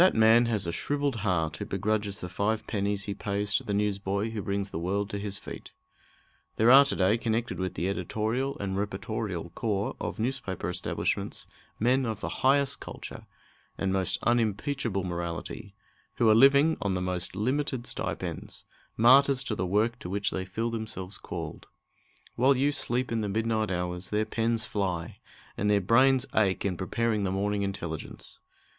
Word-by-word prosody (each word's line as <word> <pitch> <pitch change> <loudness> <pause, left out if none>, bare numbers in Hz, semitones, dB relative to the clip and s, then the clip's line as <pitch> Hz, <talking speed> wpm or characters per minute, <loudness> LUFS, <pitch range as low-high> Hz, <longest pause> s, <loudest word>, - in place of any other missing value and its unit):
That 185 - +6
man 115 +2 +6
has 110 -5 0
a 85 - -1
shrivelled 140 +7 -1
heart 85 -8 0
who - - -4
begrudges 105 +1 -1
the 90 - -4
five 105 +4 -1
pennies 100 -1 -1
he 100 - -3
pays 100 0 -2
to - - +2
the - - -4
newsboy 100 +1 0
who 110 -2 -3
brings 100 0 -2
the 80 - -3
world 100 +5 -1
to 100 - -3
his 100 -1 -3
feet. - - -9 0.8
There 115 +3 +5
are 135 +2 +10
to - - -1
day 100 +5 +3
connected 115 0 -1
with 95 -1 -2
the 90 - -1
editorial 110 +7 -1
and 95 -1 -3
reportorial 100 -3 -3
corps 105 -3 -1
of - - -3
newspaper 110 -8 -2
establishments - - -2 0.3
men 125 +3 +2
of 110 -3 -3
the - - -5
highest 140 +1 +3
culture - - -9 0.5
and 95 -1 0
most 95 -1 0
unimpeachable 115 -2 0
morality, 85 +4 -5 0.4
who 115 - +3
are - - +7
living 140 +7 +6
on 100 -3 0
the 90 - -1
most 90 -1 -3
limited 130 +3 -1
stipends, - - -5 0.3
martyrs 135 +3 +6
to 120 - -2
the 95 -3 -2
work 110 +6 +1
to 90 - -7
which 100 +2 0
they 95 - -3
feel 115 +5 -2
themselves 110 -4 -5
called. - - -6 0.7
While 130 +2 +4
you 140 +3 +3
sleep 125 -3 -1
in 115 -1 0
the 105 - -2
midnight 110 +1 0
hours, 90 0 -3
their 105 +1 +1
pens 115 0 0
fly, 90 -5 -3 0.4
and 105 - 0
their 105 -1 +4
brains 130 +6 +4
ache 100 -3 +2
in 95 -2 0
preparing 105 +4 0
the 95 - 0
morning 100 +1 0
intelligence. 95 -6 -5
105 Hz, 175 wpm, -28 LUFS, 95-115 Hz, 0.8 s, are